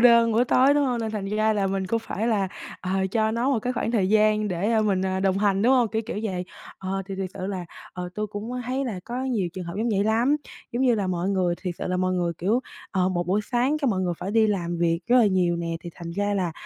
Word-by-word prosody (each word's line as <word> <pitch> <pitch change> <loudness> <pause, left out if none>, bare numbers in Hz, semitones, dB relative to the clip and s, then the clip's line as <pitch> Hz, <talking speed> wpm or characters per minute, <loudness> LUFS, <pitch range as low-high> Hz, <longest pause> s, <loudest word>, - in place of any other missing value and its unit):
đơn 235 -1 +6
buổi 235 +3 +3
tối, 265 +3 +4
đúng 290 -1 +3
hông? 245 -2 0
Nên 220 -1 -2
thành 210 -3 -3
ra 215 +2 +2
là 200 -2 +1
mình 190 0 -1
cũng 230 +4 +1
phải 225 0 -3
là, 200 -5 +1 0.3
ờ, 185 - -4 0.2
cho 220 0 +2
nó 235 +4 0
một 260 - +2
cái 250 +3 -2
khoảng 230 - -1
thời 200 -6 +2
gian 215 0 +3
để, 185 +5 -1
a, 220 - +3
mình, 195 -3 +1
à, 190 0 -1
đồng 195 0 +2
hành, 200 -1 +2
đúng 250 +3 +5
hông? 245 -4 +4
Kiểu, 220 +1 -1
kiểu 220 - -3
vậy. 185 -4 -2 0.3
Ờ, 195 0 -3
thì 195 - -5
thiệt 190 -1 -4
sự 185 - -4
là, 190 -3 -3 0.3
ờ, 180 -1 -5
tôi 215 0 -2
cũng 210 +3 -6
có 250 0 -3
thấy 265 +2 -1
là 210 -7 -4
có 245 +3 -4
nhiều 215 -9 0
trường 185 -1 -6
hợp 170 +1 -6
giống 230 +3 0
vậy 200 -2 +1
lắm. 235 +7 +3 0.4
Giống 245 +2 0
như 245 -3 +4
là 200 -3 -1
mọi 180 +1 -1
người 185 -3 +1
thiệt 180 -3 -3
sự - - -3
là 180 - 0
mọi 185 0 +1
người, 175 -2 0
kiểu, 215 +8 +1 0.3
ờ, 185 -2 +1
một 175 -2 -1
buổi 200 +4 +2
sáng 255 +5 +2
cái 280 -4 +1
mọi 185 - 0
người 180 -2 0
phải 195 - -4
đi 220 0 +4
làm 175 -4 -1
việc 165 0 +1
rất 245 +1 +4
là 225 - +6
nhiều 180 -3 +2
nè, 165 -1 -3
thì 170 - -8
thành 170 -1 -7
ra 205 +3 -1
là, 180 -4 -1
205 Hz, 290 wpm, -25 LUFS, 185-230 Hz, 0.4 s, đơn